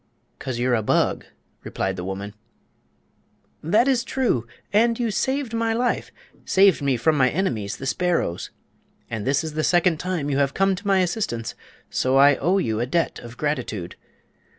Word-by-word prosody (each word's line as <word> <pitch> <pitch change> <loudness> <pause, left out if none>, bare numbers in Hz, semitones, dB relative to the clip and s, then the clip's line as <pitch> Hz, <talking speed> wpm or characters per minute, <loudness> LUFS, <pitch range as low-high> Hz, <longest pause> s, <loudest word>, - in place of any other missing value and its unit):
"'Cause 130 -3 -4
you're 125 +1 +1
a 115 - +2
bug," 105 - +1 0.4
replied 95 0 -2
the 90 - -5
woman. 100 +2 -5 1.3
"That 215 - +3
is 255 -3 +2
true; 235 - 0 0.3
and 230 +3 +3
you 235 -2 0
saved 265 +3 -1
my 230 0 0
life—saved 200 -5 +1
me 135 -3 +1
from 155 +7 +2
my 130 -3 +4
enemies, 120 - -2
the 135 - -7
sparrows. 135 - -1 0.6
And 110 -1 -4
this 135 +2 +2
is 160 -1 -5
the 155 0 -1
second 175 -2 +3
time 180 -6 -2
you 140 - +1
have 140 -1 +1
come 195 0 +3
to 200 +3 -6
my 195 -1 +4
assistance, 170 - -2 0.4
so 130 +1 +1
I 140 0 +6
owe 180 +6 +1
you 110 - 0
a 120 - -1
debt 165 +5 0
of 120 +1 -11
gratitude. 125 - -3
150 Hz, 170 wpm, -23 LUFS, 120-195 Hz, 1.3 s, I